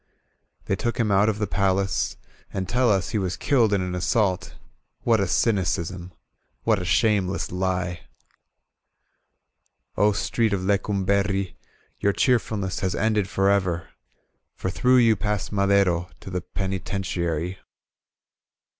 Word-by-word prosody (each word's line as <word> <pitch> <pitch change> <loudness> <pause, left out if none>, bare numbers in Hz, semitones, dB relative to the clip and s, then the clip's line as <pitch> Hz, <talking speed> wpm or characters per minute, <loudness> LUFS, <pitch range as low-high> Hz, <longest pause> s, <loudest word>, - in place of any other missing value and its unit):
They 95 - 0
took 120 +5 -3
him 110 -3 +1
out 100 +2 +4
of 105 - -1
the 105 - 0
Vcilace 95 -1 0 0.4
And 95 -1 -3
teU 125 +3 +2
us 95 -3 +1
he 110 - -1
was 95 -2 -2
kiUed 120 -7 +2
in 100 -2 +2
an 90 -1 -3
assault 95 +1 0 0.5
What 115 -2 +3
a 100 - +2
cymdsml 90 -3 0 0.5
What 110 -4 +2
a - - -4
shameless 100 0 +1
lie! 90 -1 -1 2.0
"0 105 +2 +3
Street 110 +1 0
of 95 - 0
Lecumberri 100 0 0 0.4
Your 100 - +2
cheerfulness 110 -7 0
has 95 -1 -1
ended 105 -3 +1
forever 95 -4 +1 0.7
For 95 - -3
through 125 +6 +3
you 115 -3 +5
passed 105 0 -2
Madero 100 -4 +2
To 95 - -9
the 90 0 -2
Penitentiary. 90 -2 -3
100 Hz, 130 wpm, -24 LUFS, 90-105 Hz, 2.0 s, you